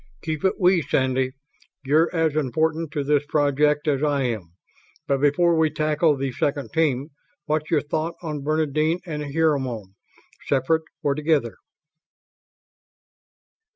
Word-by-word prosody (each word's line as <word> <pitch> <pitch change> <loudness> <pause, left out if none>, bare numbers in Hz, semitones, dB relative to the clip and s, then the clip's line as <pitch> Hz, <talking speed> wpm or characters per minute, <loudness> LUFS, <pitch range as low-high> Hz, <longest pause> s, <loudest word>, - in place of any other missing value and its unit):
"Keep 155 -2 -3
it 190 - +3
'we', 180 -1 +4
Sandy. 130 -2 0 0.5
You're 155 +5 +3
as 165 -3 0
important 160 +3 0
to 145 -3 -1
this 145 0 +2
project 150 0 +2
as 140 -2 +1
I 145 -2 +1
am. 110 -9 -3 0.5
But 135 -1 +1
before 165 +4 +3
we 160 -1 +3
tackle 155 0 +1
the 135 0 -2
second 140 +3 -2
team, 150 -3 +1 0.4
what's 155 0 -1
your 155 -3 +2
thought 160 +3 -2
on 150 -3 -4
Bernadine 155 +3 0
and 155 -4 -4
Hermione? 130 -11 0 0.6
Separate 145 +4 +2 0.2
or 140 - +2
together?" 150 -5 0
150 Hz, 130 wpm, -23 LUFS, 140-160 Hz, 0.6 s, we